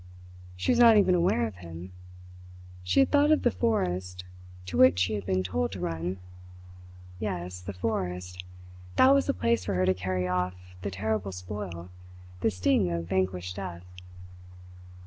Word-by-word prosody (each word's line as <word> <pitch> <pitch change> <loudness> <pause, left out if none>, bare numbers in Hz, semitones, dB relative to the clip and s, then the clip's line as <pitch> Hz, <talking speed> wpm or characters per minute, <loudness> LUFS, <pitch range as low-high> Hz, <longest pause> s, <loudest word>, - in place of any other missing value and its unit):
She 90 - 0
was 245 - +2
not 230 -2 +8
even 195 -3 +4
aware 170 -9 +2
of 105 -5 -7
him. 85 +1 -9 0.9
She 90 - +3
had 270 - +2
thought 290 0 +4
of 310 - +3
the 245 - +3
forest, 90 - -1 0.4
to 90 - -6
which 85 +1 +6
she 95 +4 +1
had 100 -3 -4
been 95 -1 +1
told 80 -2 -1
to 95 - -6
run. 85 +1 -3 1.0
Yes, 90 -3 -4
the 95 +2 -6
forest 90 -2 -3 0.5
that 265 +1 +6
was 275 0 +2
the 275 - +2
place 115 -3 +1
for 100 -1 -1
her 90 +1 +2
to 95 - +3
carry 90 0 -2
off 90 0 -1 0.3
the 100 - -3
terrible 100 +1 -2
spoil, 90 -1 -7 0.5
the 105 - +2
sting 90 -1 +1
of 85 0 -3
vanquished 95 -1 -1
death. 90 -3 -6
90 Hz, 165 wpm, -28 LUFS, 90-105 Hz, 1.0 s, not